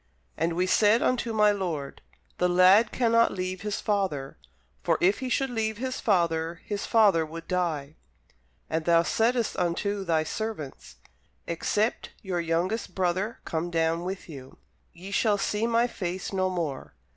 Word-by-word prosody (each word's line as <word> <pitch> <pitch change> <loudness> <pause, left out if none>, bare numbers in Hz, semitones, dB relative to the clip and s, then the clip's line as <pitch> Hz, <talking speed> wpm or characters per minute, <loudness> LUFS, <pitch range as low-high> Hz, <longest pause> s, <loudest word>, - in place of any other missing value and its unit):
And 165 +2 0
we 180 +2 +1
said 210 +4 +4
unto 240 -2 0
my 210 -1 +4
lord, 170 -9 -4 0.4
The 180 - +2
lad 185 +5 +5
cannot 230 -1 +3
leave 185 0 -4
his 210 -1 -3
father: 185 -10 -1 0.5
for - - +1
if 190 +3 +3
he 260 - -4
should 270 +1 0
leave 220 -2 -1
his 260 +2 -3
father, 170 -4 +1
his 205 -1 -4
father 205 -8 +4
would 165 +1 -8
die. 160 -6 -1 0.7
And 160 0 -2
thou 170 -1 +4
saidst 230 +5 +1
unto 195 +3 -1
thy 160 -3 +1
servants, 185 -5 -6 0.5
Except 205 +6 -1
your 185 -3 -2
youngest 170 +7 -1
brother 190 +4 -1
come 165 +1 -2
down 165 0 0
with 190 +1 -5
you, 135 -5 -11 0.3
ye 185 +4 -10
shall 205 0 +2
see 210 +3 -1
my 235 0 +3
face 185 -5 -4
no 185 -1 +1
more. 155 - -4
185 Hz, 155 wpm, -27 LUFS, 165-215 Hz, 0.7 s, lad